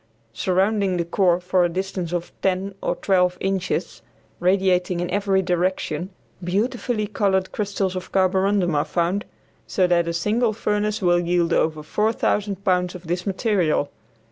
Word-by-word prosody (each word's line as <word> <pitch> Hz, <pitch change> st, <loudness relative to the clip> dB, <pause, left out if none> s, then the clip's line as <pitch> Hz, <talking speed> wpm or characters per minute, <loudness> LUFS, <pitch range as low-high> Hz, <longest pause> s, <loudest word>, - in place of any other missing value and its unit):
Surrounding 190 Hz, -, +1 dB
the 170 Hz, -, -1 dB
core 175 Hz, 0 st, +2 dB
for 180 Hz, 0 st, +2 dB
a 175 Hz, -, +2 dB
distance 185 Hz, -1 st, -3 dB
of 175 Hz, -1 st, -3 dB
ten 190 Hz, +1 st, 0 dB
or -, -, -1 dB
twelve 180 Hz, -2 st, +2 dB
inches, 190 Hz, -1 st, -2 dB, 0.4 s
radiating 180 Hz, -1 st, +2 dB
in 175 Hz, -, -1 dB
every 195 Hz, -1 st, +1 dB
direction, 180 Hz, -1 st, -1 dB, 0.3 s
beautifully 215 Hz, +4 st, -1 dB
colored 190 Hz, -2 st, 0 dB
crystals 195 Hz, -2 st, -2 dB
of 185 Hz, 0 st, -6 dB
carborundum 190 Hz, -1 st, +2 dB
are 145 Hz, 0 st, +2 dB
found, 175 Hz, +4 st, -1 dB, 0.4 s
so 185 Hz, -, +2 dB
that 175 Hz, -1 st, +2 dB
a -, -, 0 dB
single 215 Hz, +6 st, +1 dB
furnace 210 Hz, -1 st, -1 dB
will 175 Hz, -1 st, +4 dB
yield 175 Hz, -1 st, +1 dB
over 155 Hz, -1 st, +1 dB
4000 205 Hz, +1 st, 0 dB
pounds 180 Hz, -2 st, +1 dB
of 180 Hz, 0 st, -10 dB
this 175 Hz, +3 st, -3 dB
material. 185 Hz, -7 st, +1 dB
185 Hz, 145 wpm, -23 LUFS, 175-200 Hz, 0.4 s, will